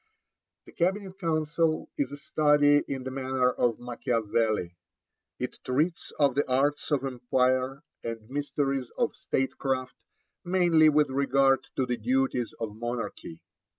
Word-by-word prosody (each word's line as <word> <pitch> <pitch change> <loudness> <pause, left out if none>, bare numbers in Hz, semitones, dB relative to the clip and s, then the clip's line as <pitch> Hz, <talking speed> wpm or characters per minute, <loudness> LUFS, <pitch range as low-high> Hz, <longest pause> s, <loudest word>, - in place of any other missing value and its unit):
The - - -14
Cabinet 190 +2 -1
Council 160 -1 0
is 140 -2 -1
a 145 - -6
study 145 0 +4
in 135 -2 -4
the 130 - -5
manner 130 -1 +1
of 120 -2 0
Macchiavelli. 115 -5 -1 0.6
It - - -5
treats 155 +7 -1
of 140 -3 +3
the 140 +3 +2
arts 140 +3 +1
of 140 -3 +1
empire 130 +2 0 0.2
and 115 -2 -5
mysteries 135 -1 -2
of - - 0
State 135 0 -2
craft, 130 -2 -1 0.5
mainly 175 -3 +4
with 150 -2 +3
regard 135 0 +2
to 130 - +1
the 125 -1 -2
duties 125 +1 0
of 110 -2 -4
monarchy. 115 -7 -5
135 Hz, 135 wpm, -28 LUFS, 125-145 Hz, 0.6 s, study